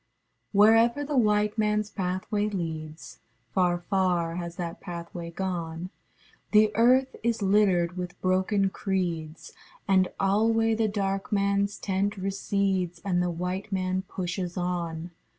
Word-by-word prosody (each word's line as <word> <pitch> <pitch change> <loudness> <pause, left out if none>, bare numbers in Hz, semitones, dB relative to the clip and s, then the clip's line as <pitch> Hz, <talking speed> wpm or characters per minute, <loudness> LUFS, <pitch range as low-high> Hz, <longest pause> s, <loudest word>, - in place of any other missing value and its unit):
Wherever 225 +6 +5
the 290 0 -3
white 210 -3 +2
manâs 210 -1 0
pathway 195 +3 -1
leads, 160 -5 -6 0.3
(Far, 180 -2 +2
far 175 -2 0
has 170 -1 -5
that 170 -2 -5
pathway 170 -1 -6
gone) 170 -1 -4 0.6
The 215 0 +5
Earth 255 +3 +4
is 230 -2 0
littered 190 -3 +3
with 180 -1 -5
broken 190 +1 +1
creedsâ 170 -6 -3 0.4
And 190 -2 +4
alway 225 +3 +3
the 220 0 +1
dark 195 -1 -2
manâs 200 0 +1
tent 200 +1 -1
recedes, 190 -2 -1
And 180 -3 +1
the 180 - 0
white 180 +4 -4
man 185 -1 0
pushes 180 -1 -4
on. 175 -2 -3
190 Hz, 125 wpm, -27 LUFS, 175-210 Hz, 0.6 s, Wherever